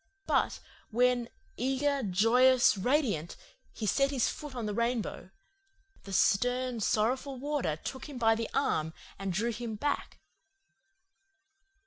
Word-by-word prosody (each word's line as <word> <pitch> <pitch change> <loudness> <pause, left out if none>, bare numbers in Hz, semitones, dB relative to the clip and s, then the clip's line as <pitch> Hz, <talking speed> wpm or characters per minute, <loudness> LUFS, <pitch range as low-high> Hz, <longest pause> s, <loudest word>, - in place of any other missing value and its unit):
But - - +1 0.3
when, 245 +1 +2 0.3
eager, 270 +3 0
joyous, 240 +6 +4
radiant, 205 - 0 0.3
he 220 - -5
set 275 +6 +2
his 265 -4 +1
foot 295 -3 -7
on 240 -3 -3
the 210 - -2
rainbow, 235 -4 -2 0.8
the 195 - -8
stern, 245 +5 +2
sorrowful 255 +6 0
Warder 275 - -1
took 260 - -7
him 280 - -7
by 225 -2 +4
the 225 0 -3
arm 160 +1 0 0.2
and 195 -1 -2
drew 220 +6 0
him 230 -1 -5
back. 290 +7 -2
240 Hz, 125 wpm, -30 LUFS, 210-260 Hz, 0.8 s, joyous